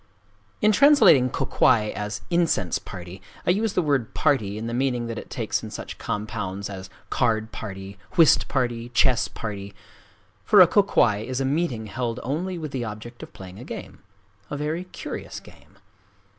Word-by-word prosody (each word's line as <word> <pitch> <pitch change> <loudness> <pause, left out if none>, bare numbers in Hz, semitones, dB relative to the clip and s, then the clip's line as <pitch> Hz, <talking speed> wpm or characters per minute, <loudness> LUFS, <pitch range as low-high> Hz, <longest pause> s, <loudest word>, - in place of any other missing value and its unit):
In 215 - +6
translating 240 - +6
kō - - -2
kwai 105 -1 +3
as 105 0 -4
"incense 170 - +1
party," 90 0 -9 0.2
I - - +4
use 210 +2 0
the 180 - +1
word 140 -7 0
"party" 110 -9 +1
in 110 - -5
the 115 - -3
meaning 125 -1 0
that 115 -1 -4
it - - -11
takes - - -2
in - - -7
such - - -7
compounds 100 -2 -4
as 95 -1 -8 0.2
"card 110 -3 +1
party," 95 -2 -8 0.2
"whist 165 -3 +5
party," 120 -3 -1
"chess 125 -2 +3
party";—for 100 - -3
a 180 - +10
kō 200 +3 +3
kwai 105 -3 +3
is 125 +5 -4
a 135 - 0
meeting 135 -6 -1
held 115 +2 -3
only 175 +7 -2
with 155 -3 -5
the 130 -3 -3
object 115 +2 -8
of - - -9
playing 95 +1 -11
a - - -8
game,—a 100 +2 -10
very 155 +5 -2
curious 180 - -7
game. - - -19
115 Hz, 170 wpm, -24 LUFS, 100-145 Hz, 0.2 s, a